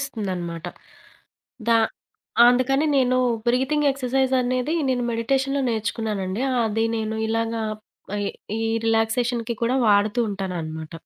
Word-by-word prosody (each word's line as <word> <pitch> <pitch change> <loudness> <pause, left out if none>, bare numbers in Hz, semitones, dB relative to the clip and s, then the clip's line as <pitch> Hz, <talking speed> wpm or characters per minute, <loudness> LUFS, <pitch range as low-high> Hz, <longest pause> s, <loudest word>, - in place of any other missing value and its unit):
ఇస్తుందనమాట. 185 - -4 1.0
దా 230 - +6 0.7
అందుకని 255 +4 +3
నేను 255 -1 +3 0.3
breathing 265 +4 +2
exercise 265 0 0
అనేది 255 +5 0 0.2
నేను 245 -1 0
మెడిటేషన్‌లొ 270 +4 0
నేర్చుకున్నానండి. 215 -1 -2 0.2
అది 225 +1 0
నేను 220 0 -2
ఇలాగా 225 0 -1 0.5
ఆహ్, 205 -1 -1 0.3
ఈ 225 - -2 0.2
రిలాక్సేషన్‌కి 230 +1 +1
కూడా 250 +3 +2
వాడుతూ 205 +3 +3
ఉంటాననమాట. 165 -5 -5
230 Hz, 105 wpm, -23 LUFS, 210-255 Hz, 1.0 s, దా